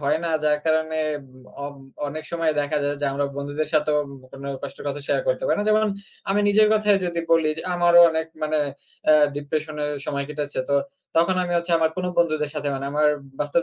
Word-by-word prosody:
হয় 145 +2 +1
না। 165 - 0
যার 150 -1 +3
কারণে 160 0 +1 0.7
অব 145 - -6 0.3
অনেক 155 +2 -6
সময় 165 -2 +1
দেখা 145 +1 -1
যায়, 145 0 0
যে 145 - +1
আমরা 140 +1 -1
বন্ধুদের 145 +2 -2
সাথেও 150 -1 +3 0.3
কোন 135 0 -10 0.2
কষ্টর 140 - -6
কথা 140 +1 -3
শেয়ার - - +2
করতে - - 0
পারি - - +2
না। 205 - -1
যেমন 215 0 +4 0.5
আমি 200 +1 +2
নিজের 215 +1 +5
কথাই 210 -1 +5
যদি 170 -1 -2
বলি, 160 -2 +4
যে - - 0
আমারও 175 0 +6
অনেক 160 0 -1 0.2
মানে 155 0 +1 0.5
এ্যা 155 - +8 0.2
ডিপ্রেশন 150 +1 -3
এর 150 - -1 0.2
সময় 140 -1 -1
কেটেছে। 145 -2 -2
তো - - +3 0.4
তখন 170 +3 +4
আমি 175 - -3
হচ্ছে 170 0 -1
আমার 160 -1 +2
কোন 185 - -2
বন্ধুদের 155 -3 +1
সাথে 145 - -1
মানে 135 0 -4
আমার 150 0 +3 0.3
বাস্তব 150 +3 +1
155 Hz, 205 wpm, -23 LUFS, 145-170 Hz, 0.7 s, এ্যা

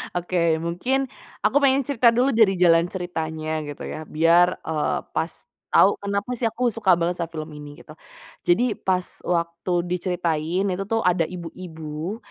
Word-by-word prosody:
Oke 170 -2 +1
mungkin 180 +12 -1 0.4
aku - - +4
pengen 275 -1 +3
cerita 250 -3 +4
dulu 245 +4 +2
dari 210 -5 +4
jalan 170 -1 +4
ceritanya 160 -4 -3
gitu 145 - -7
ya 155 - -6
biar, 170 +3 +4
eee, 155 -2 0
pas 165 - -1 0.4
tau 200 - +5
kenapa 200 +4 -2
sih 235 -2 0
aku 240 +1 -1
suka 195 -6 +3
banget 175 +1 -1
sama 165 - -3
film 155 -1 -7
ini 145 -1 -10
gitu. 155 - -12 0.5
Jadi 225 +7 +2
pas 185 -2 -1 0.2
waktu 170 +1 -2
diceritain, 175 -1 -1
itu 190 -1 -1
tuh 225 -2 0
ada 175 -3 +2
ibu-ibu 165 0 -6
175 Hz, 155 wpm, -23 LUFS, 165-200 Hz, 0.5 s, tau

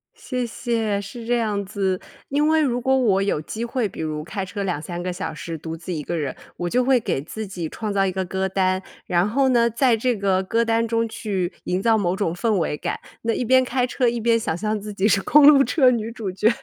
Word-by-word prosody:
谢 255 - -3
谢， 225 -3 -1
是 225 +4 -8
这 240 +1 +2
样 210 -3 -1
子。 190 -2 -1 0.3
因 295 +2 +2
为 315 0 +4
如 250 -4 +1
果 265 +2 +2
我 200 -7 +3
有 195 -6 0
机 220 +9 -5
会， 235 -2 -1
比 - - -10
如 155 -1 -3
开 195 +3 -4
车 195 +2 -5
2-3 175 -1 -3
个 180 0 -2
小 170 - -4
时 165 +2 -6
独 160 +1 -6
自 170 +2 -6
一 155 -3 -3
个 170 - -3
人， 145 -5 -2 0.2
我 175 - -2
就 250 +7 +2
会 260 -1 +4
给 205 - -2
自 215 +7 -6
己 180 -4 -5
创 215 +5 -4
造 195 -1 +2
一 190 - +1
个 190 0 -2
歌 190 +1 -2
单。 185 0 +1 0.2
然 180 +2 +2
后 265 +4 +2
呢， 235 -2 +3
在 235 0 +3
这 245 +1 0
个 195 -2 +1
歌 230 +5 +1
单 230 0 +1
中 230 0 0
去 195 -5 -3
营 180 +1 -1
造 225 +2 +3
某 185 -3 0
种 175 -4 -1
氛 225 +5 -1
围 160 -3 -1
感， - - -3 0.2
那 230 - 0
一 250 - -1
边 260 +2 +4
开 250 0 0
车 250 -1 +1
一 235 0 -1
边 230 0 +3
想 165 -7 -2
象 215 +3 -2
自 210 +1 -7
己 200 0 0
是 200 -2 +3
公 295 -1 +6
路 285 -2 +8
车 270 -3 +4
女 230 -2 -1
主 225 -4 -5
角， 210 +4 +2
210 Hz, 265 characters per minute, -23 LUFS, 185-235 Hz, 0.3 s, 路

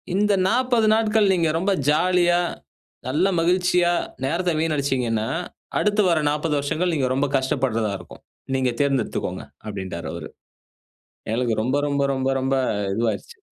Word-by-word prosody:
இந்த 205 +1 +3 0.2
40 240 -2 +2
நாட்கள் 220 -2 +3
நீங்க 170 -3 +2
ரொம்ப 195 +4 0 0.2
ஜாலியா, 175 +2 +3 0.7
நல்ல 170 +8 +2
மகிழ்ச்சியா 180 0 +2 0.3
நேரத்த 175 +6 0
வீணடிச்சீங்கன்னா, 130 -8 0 0.5
அடுத்து 210 0 +2
வர 165 -2 +3
40 150 +1 -1
வருஷகள் 165 +5 -1
நீங்க 135 -3 +1
ரொம்ப 140 +2 +1
கஷ்டப்படுறதா 125 -5 0
இருக்கும். - - -14 0.3
நீங்க 130 -1 +1
தேர்ந்தெடுத்துக்கோங்க 135 -4 -1 0.2
அப்டின்டாரு 95 -4 -5
அவரு. - - -6 1.0
எங்களுக்கு 115 +1 0
ரொம்ப 130 +4 0
ரொம்ப 140 0 0
ரொம்ப 130 0 -1
ரொம்ப 135 +1 0 0.4
இதுவாயிருச்சு. 120 - -2
150 Hz, 125 wpm, -23 LUFS, 130-180 Hz, 1.0 s, இந்த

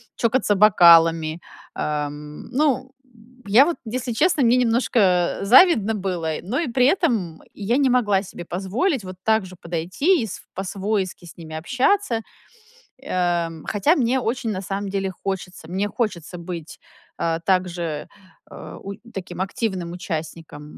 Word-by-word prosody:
чокаться 230 -2 +1
бокалами. 165 -5 +5 0.3
Эм, 150 0 -4
ну, 260 -2 +1 0.6
я 230 +8 +6
вот, 345 - -2
если 245 +2 -3
честно, 300 +2 +2
мне 240 +2 +4
немножко 225 -7 +2
завидно 225 - +5
было, 180 -5 -2
но 240 - -2
и 330 - -1
при 250 +1 +2
этом 235 - +1
я 215 +5 -1
не 275 -2 +3
могла 210 -6 +2
себе 175 -2 -9
позволить 205 - -1
вот 185 0 -8
так 220 -3 +2
же 185 - -12
подойти 180 - 0
и - - -3
с - - -8
по-свойски 190 -1 -3
с 170 - -12
ними 160 -2 -9
общаться. 250 - +1 0.8
Эм, 175 - -1
хотя 250 - +2
мне 255 -1 +2
очень, 235 -1 -2
на 190 -2 -3
самом 195 +1 -4
деле, 195 -1 -2
хочется. 185 -1 -6
Мне 195 +4 -1
хочется 185 -6 -3
быть, 170 -2 -8 0.4
а, 165 -1 0
также, 175 -4 -1 0.4
э, - - -10
у 200 +1 -6 0.2
таким 180 -3 -7
активным 190 -3 -3
участником, 165 -3 -6
195 Hz, 140 wpm, -22 LUFS, 175-240 Hz, 0.8 s, я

